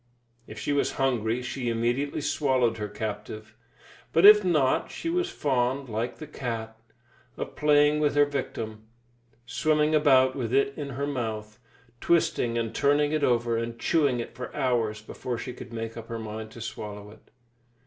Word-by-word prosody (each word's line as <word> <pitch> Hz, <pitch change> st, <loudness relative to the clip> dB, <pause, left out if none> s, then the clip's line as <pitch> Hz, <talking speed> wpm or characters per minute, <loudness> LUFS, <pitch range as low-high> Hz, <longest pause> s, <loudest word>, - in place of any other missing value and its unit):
If 110 Hz, -, -10 dB
she 145 Hz, -, -1 dB
was 140 Hz, -, +1 dB
hungry, 125 Hz, -2 st, 0 dB
she 125 Hz, -1 st, -3 dB
immediately 120 Hz, +6 st, -1 dB
swallowed 130 Hz, -6 st, +1 dB
her 105 Hz, -1 st, -3 dB
captive, 110 Hz, +1 st, -6 dB, 0.6 s
but 165 Hz, +4 st, +4 dB
if 210 Hz, 0 st, +10 dB
not, 155 Hz, -8 st, +2 dB
she 330 Hz, -, -4 dB
was 360 Hz, +1 st, 0 dB
fond, 135 Hz, -, -1 dB
like 115 Hz, +3 st, -3 dB
the 155 Hz, -, -8 dB
cat, 115 Hz, -6 st, -5 dB, 0.6 s
of -, -, -5 dB
playing 150 Hz, 0 st, +4 dB
with 150 Hz, -1 st, +1 dB
her 145 Hz, 0 st, +6 dB
victim, 110 Hz, -6 st, -5 dB, 0.6 s
swimming 150 Hz, +4 st, +1 dB
about 130 Hz, -4 st, +5 dB
with 120 Hz, -5 st, -3 dB
it 140 Hz, +1 st, +2 dB
in 145 Hz, -2 st, -5 dB
her 140 Hz, -, -1 dB
mouth, 110 Hz, -5 st, -4 dB, 0.4 s
twisting 125 Hz, -8 st, +1 dB
and 115 Hz, -1 st, -2 dB
turning 145 Hz, +2 st, +2 dB
it 155 Hz, -1 st, 0 dB
over, 120 Hz, -2 st, +2 dB
and 115 Hz, 0 st, -3 dB
chewing 140 Hz, -1 st, +2 dB
it 115 Hz, -, -6 dB
for 125 Hz, -, -7 dB
hours 115 Hz, -6 st, 0 dB
before 120 Hz, +2 st, -5 dB
she 125 Hz, +2 st, -6 dB
could 125 Hz, -1 st, -10 dB
make 115 Hz, 0 st, -5 dB
up 115 Hz, -1 st, -8 dB
her 115 Hz, -, -4 dB
mind 110 Hz, 0 st, -6 dB
to 115 Hz, -, -10 dB
swallow 105 Hz, -2 st, -7 dB
it. 110 Hz, -, -19 dB
125 Hz, 170 wpm, -27 LUFS, 115-145 Hz, 0.6 s, if